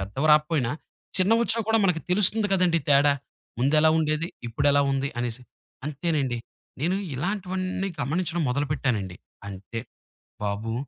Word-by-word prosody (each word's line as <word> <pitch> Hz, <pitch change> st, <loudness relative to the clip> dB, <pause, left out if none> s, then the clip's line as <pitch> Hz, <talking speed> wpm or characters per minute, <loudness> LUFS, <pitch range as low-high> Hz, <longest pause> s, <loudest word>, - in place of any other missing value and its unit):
పెద్దవి 105 Hz, +10 st, -2 dB
రాపోయినా, 150 Hz, -5 st, +2 dB, 0.5 s
చిన్నవొచ్చినా 225 Hz, +4 st, +3 dB
కూడా 225 Hz, 0 st, +4 dB
మనకు 180 Hz, -4 st, +2 dB
తెలుస్తుంది 205 Hz, +3 st, +3 dB
కదండీ 180 Hz, -3 st, +3 dB
తేడా. 145 Hz, 0 st, +5 dB, 0.5 s
ముందెలా 150 Hz, +4 st, +4 dB
ఉండేది? 155 Hz, +1 st, 0 dB, 0.2 s
ఇప్పుడెలా 140 Hz, +5 st, +3 dB
ఉంది? 135 Hz, +1 st, 0 dB
అనేసి. 120 Hz, +1 st, -3 dB, 0.4 s
అంతేనండి. 145 Hz, -4 st, -1 dB, 0.4 s
నేను 180 Hz, +5 st, +1 dB, 0.2 s
ఇలాంటివన్నీ 185 Hz, +4 st, -2 dB
గమనించడం 170 Hz, +4 st, -1 dB
మొదలుపెట్టానండి. 125 Hz, -9 st, -1 dB, 0.3 s
అంతే. 100 Hz, +4 st, -6 dB, 0.6 s
బాబు! 105 Hz, +2 st, -2 dB
150 Hz, 110 wpm, -25 LUFS, 125-180 Hz, 0.6 s, తేడా